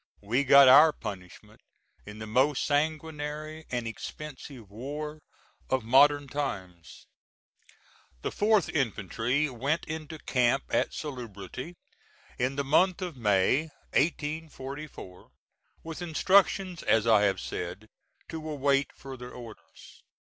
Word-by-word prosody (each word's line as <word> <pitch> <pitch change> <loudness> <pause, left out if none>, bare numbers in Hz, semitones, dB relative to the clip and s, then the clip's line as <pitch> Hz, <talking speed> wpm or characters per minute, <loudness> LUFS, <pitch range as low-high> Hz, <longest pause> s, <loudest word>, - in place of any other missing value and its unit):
We 115 +7 +1
got 140 0 +8
our 150 +5 +9
punishment 95 -9 -9 0.5
in 105 0 -9
the 110 - -6
most 130 +6 +2
sanguinary 155 +1 -2
and 120 -2 -2
expensive 130 -2 -8
war 150 +7 -6 0.5
of 130 -3 +1
modern 140 +4 +5
times. 95 - -6 1.2
The - - -2
4th 210 -2 +2
infantry 125 - 0
went 140 +5 -2
into 160 0 -6
camp 125 -2 +1
at - - +1
Salubrity 125 - -7 0.6
in 130 +2 0
the 140 - -1
month 180 +7 +2
of 175 -4 -5
May, 115 +7 +2 0.2
1844, 150 - -3 0.5
with 165 +1 -7
instructions, 185 +1 +2
as 110 -1 +2
I 110 -3 +5
have 95 -2 +1
said, 90 +4 -5 0.4
to 160 -1 -6
await 140 -2 +1
further 130 -2 -9
orders. 115 -3 -13
140 Hz, 110 wpm, -28 LUFS, 115-155 Hz, 1.2 s, our